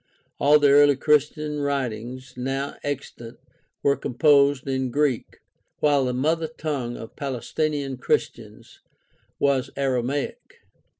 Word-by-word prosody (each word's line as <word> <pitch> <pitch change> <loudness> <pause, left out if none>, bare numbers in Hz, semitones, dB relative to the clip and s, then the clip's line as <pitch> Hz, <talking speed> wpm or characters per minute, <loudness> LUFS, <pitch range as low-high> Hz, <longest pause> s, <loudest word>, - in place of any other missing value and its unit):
All 145 +2 +6
the 145 -2 +4
early 145 0 +6
Christian 150 +1 +1
writings 130 -2 -3
now 135 +2 -3
extant 125 -4 -6 0.5
were 140 0 +3
composed 140 +1 +3
in 130 -1 -1
Greek, 140 -2 -1 0.4
while 145 -3 +3
the 125 - 0
mother 160 +5 0
tongue 135 -6 -3
of 115 - -10
Palestinian 140 +1 -3
Christians 125 - -3 0.6
was 140 -2 +1
Aramaic. 135 0 -2
140 Hz, 110 wpm, -24 LUFS, 130-145 Hz, 0.6 s, All